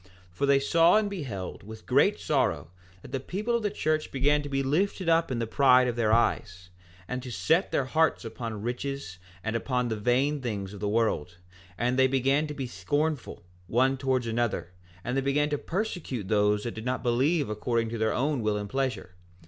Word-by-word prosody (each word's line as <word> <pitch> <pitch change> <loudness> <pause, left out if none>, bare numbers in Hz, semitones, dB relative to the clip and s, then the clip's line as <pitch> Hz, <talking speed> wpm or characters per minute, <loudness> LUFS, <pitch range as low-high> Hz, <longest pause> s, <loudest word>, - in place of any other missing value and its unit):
4:8 - - -23 0.2
For 90 +11 -1
they 140 0 +5
saw 165 +7 +4
and 210 -2 0
beheld 120 - -5
with 110 +2 -11
great - - +3
sorrow - - 0 0.3
that - - -11
the 135 - -1
people 210 - -2
of 235 - 0
the 210 - 0
church 155 -6 -1
began 145 +2 +2
to 145 - -7
be 135 0 0
lifted 180 +6 0
up 165 0 +3
in 130 - -2
the 115 - -1
pride 125 +1 +5
of 120 - -1
their 115 -2 +1
eyes, 95 -5 0 0.4
and 125 +4 -3
to 125 - -8
set 120 - +1
their 135 - +1
hearts 160 -1 +1
upon 115 -2 -6
riches 125 -5 -4 0.2
and 110 +1 -2
upon 125 +1 -1
the 110 - -1
vain 130 +7 +1
things 105 -5 -4
of 100 - -9
the 105 0 -1
world, 105 -6 0 0.4
that 125 +2 0
they 130 0 +5
began 135 +3 +1
to 150 - -6
be 135 - -3
scornful, 145 - -2 0.2
one 130 +6 +2
towards 130 -2 0
another, 115 -6 -1 0.3
and 125 +2 -2
they 135 - +2
began 145 +2 +1
to 145 - +1
persecute 170 - -3
those 105 -1 +2
that 120 - -4
did 110 - -7
not 130 0 -2
believe 135 +6 +2
according 115 +2 -1
to 115 0 -4
their 110 0 +2
own 140 0 0
will 105 -1 0
and 105 -1 -5
pleasure. 130 -9 -2
125 Hz, 205 wpm, -28 LUFS, 110-145 Hz, 0.4 s, they